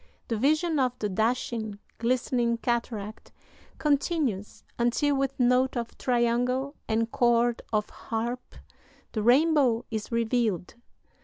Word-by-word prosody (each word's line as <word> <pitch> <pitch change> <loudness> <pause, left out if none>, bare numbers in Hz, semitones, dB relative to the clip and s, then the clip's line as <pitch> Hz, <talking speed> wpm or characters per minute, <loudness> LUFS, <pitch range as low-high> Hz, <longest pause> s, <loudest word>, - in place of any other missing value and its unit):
The 230 - 0
vision 310 +5 +2
of 250 -2 +1
the 210 - -2
dashing, 220 0 -1 0.2
glistening 240 0 +1
cataract 230 -3 -3 0.5
continues 285 - 0 0.2
until, 245 +5 +2
with 270 0 -1
note 250 +1 +3
of 235 -1 -4
triangle 250 +3 0
and 225 +1 0
chord 240 0 +2
of 210 -1 +1
harp, 235 +2 -4 0.6
the 215 - -2
rainbow 255 -1 +4
is 220 0 -4
revealed." 230 -6 0
240 Hz, 110 wpm, -27 LUFS, 225-260 Hz, 0.6 s, rainbow